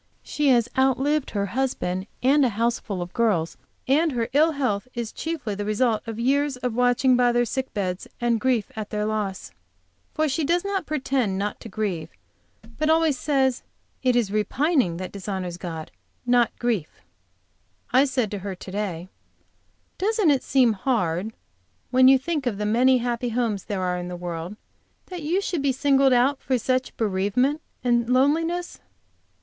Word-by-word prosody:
She 295 Hz, -1 st, -1 dB
has 240 Hz, -3 st, +4 dB
outlived 270 Hz, +2 st, +2 dB
her 200 Hz, -1 st, -1 dB
husband, 200 Hz, -5 st, -2 dB, 0.2 s
a 270 Hz, 0 st, +4 dB
houseful 220 Hz, -4 st, -1 dB
of 175 Hz, -, -11 dB
girls 200 Hz, -9 st, +1 dB, 0.3 s
and 300 Hz, +3 st, +3 dB
her 230 Hz, -2 st, -1 dB
ill 315 Hz, +3 st, +4 dB
health 255 Hz, -6 st, -1 dB
is 235 Hz, -2 st, -3 dB
chiefly 320 Hz, -10 st, -4 dB
the 205 Hz, +1 st, -4 dB
result 215 Hz, +2 st, +1 dB
of 225 Hz, 0 st, -5 dB
years 275 Hz, +2 st, +1 dB
of 250 Hz, -2 st, -3 dB
watching 250 Hz, +2 st, +3 dB
by 245 Hz, -1 st, +4 dB
their 240 Hz, 0 st, +2 dB
sick 265 Hz, +3 st, -3 dB
beds, 185 Hz, -3 st, -2 dB
and 235 Hz, -1 st, +1 dB
grief 240 Hz, -3 st, 0 dB
at 215 Hz, -1 st, -5 dB
their 210 Hz, 0 st, -2 dB
loss. 210 Hz, -3 st, -3 dB, 0.6 s
For 310 Hz, 0 st, +2 dB
she 305 Hz, +3 st, -1 dB
does 345 Hz, +5 st, +1 dB
not 390 Hz, -4 st, -2 dB
pretend 260 Hz, -9 st, 0 dB
not 205 Hz, +1 st, -3 dB
to 225 Hz, -, -9 dB
grieve, 185 Hz, -8 st, -3 dB, 0.7 s
but 310 Hz, 0 st, +1 dB
always 320 Hz, -2 st, +3 dB
says, 265 Hz, -2 st, +1 dB, 0.4 s
"It 255 Hz, -2 st, +2 dB
is 230 Hz, -5 st, +1 dB
repining 235 Hz, -, +1 dB
that 185 Hz, +1 st, -6 dB
dishonors 190 Hz, -3 st, -5 dB
God, 165 Hz, -3 st, -6 dB, 0.3 s
not 245 Hz, -2 st, +4 dB
grief." 225 Hz, -10 st, -2 dB, 0.9 s
I 260 Hz, +3 st, +6 dB
said 255 Hz, -6 st, -1 dB
to 205 Hz, -, -4 dB
her 195 Hz, 0 st, -5 dB
to 185 Hz, -, -10 dB
day: 185 Hz, -4 st, -3 dB, 0.9 s
"Doesn't 420 Hz, -4 st, +2 dB
it 275 Hz, -, +2 dB
seem 255 Hz, -4 st, +3 dB
hard 195 Hz, -3 st, -1 dB, 0.6 s
when 255 Hz, 0 st, +6 dB
you 270 Hz, 0 st, +7 dB
think 290 Hz, 0 st, -2 dB
of 215 Hz, -5 st, -1 dB
the 210 Hz, -, -2 dB
many 250 Hz, +5 st, +4 dB
happy 240 Hz, 0 st, -2 dB
homes 225 Hz, -4 st, -1 dB
there 195 Hz, -3 st, -3 dB
are 180 Hz, -1 st, -1 dB
in 175 Hz, -, -5 dB
the 180 Hz, -, -5 dB
world, 175 Hz, +1 st, -5 dB, 0.6 s
that 360 Hz, -2 st, -5 dB
you 340 Hz, +6 st, 0 dB
should 350 Hz, -6 st, -2 dB
be 280 Hz, -1 st, +2 dB
singled 270 Hz, 0 st, +3 dB
out 255 Hz, +3 st, +3 dB
for 260 Hz, -, 0 dB
such 255 Hz, +2 st, -1 dB
bereavement 220 Hz, +8 st, +1 dB, 0.2 s
and 240 Hz, -1 st, +2 dB
loneliness?" 325 Hz, +7 st, +1 dB
245 Hz, 170 wpm, -24 LUFS, 205-270 Hz, 0.9 s, you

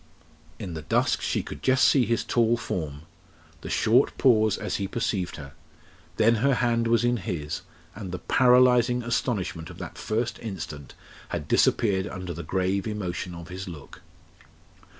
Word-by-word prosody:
In 90 Hz, -, -6 dB
the 80 Hz, -, -5 dB
dusk -, -, +1 dB
she -, -, -1 dB
could -, -, -8 dB
just 130 Hz, 0 st, +4 dB
see 130 Hz, -4 st, +4 dB
his 115 Hz, -1 st, +1 dB
tall 120 Hz, 0 st, +2 dB
form 80 Hz, -10 st, -4 dB, 0.6 s
the -, -, -7 dB
short -, -, +3 dB
pause 110 Hz, -4 st, +4 dB
as -, -, -3 dB
he 100 Hz, -, -2 dB
perceived 100 Hz, -4 st, -2 dB
her 70 Hz, -2 st, -10 dB, 0.6 s
then 115 Hz, +1 st, +4 dB
her 135 Hz, +4 st, +2 dB
hand 115 Hz, -2 st, +1 dB
was 115 Hz, 0 st, +3 dB
in 120 Hz, 0 st, +2 dB
his, 85 Hz, -8 st, -4 dB, 0.3 s
and 100 Hz, -4 st, -7 dB
the 90 Hz, -, -3 dB
paralysing 125 Hz, +3 st, +4 dB
astonishment 95 Hz, -, -2 dB
of -, -, -11 dB
that -, -, -8 dB
first 115 Hz, +2 st, -2 dB
instant 80 Hz, -, -7 dB, 0.3 s
had -, -, -4 dB
disappeared 100 Hz, -3 st, +2 dB
under 90 Hz, -3 st, -6 dB
the 85 Hz, -, -6 dB
grave 95 Hz, +3 st, -1 dB
emotion 90 Hz, -4 st, -4 dB
of 85 Hz, 0 st, -10 dB
his 95 Hz, +2 st, -6 dB
look. 80 Hz, -6 st, -10 dB
105 Hz, 160 wpm, -26 LUFS, 90-120 Hz, 0.6 s, just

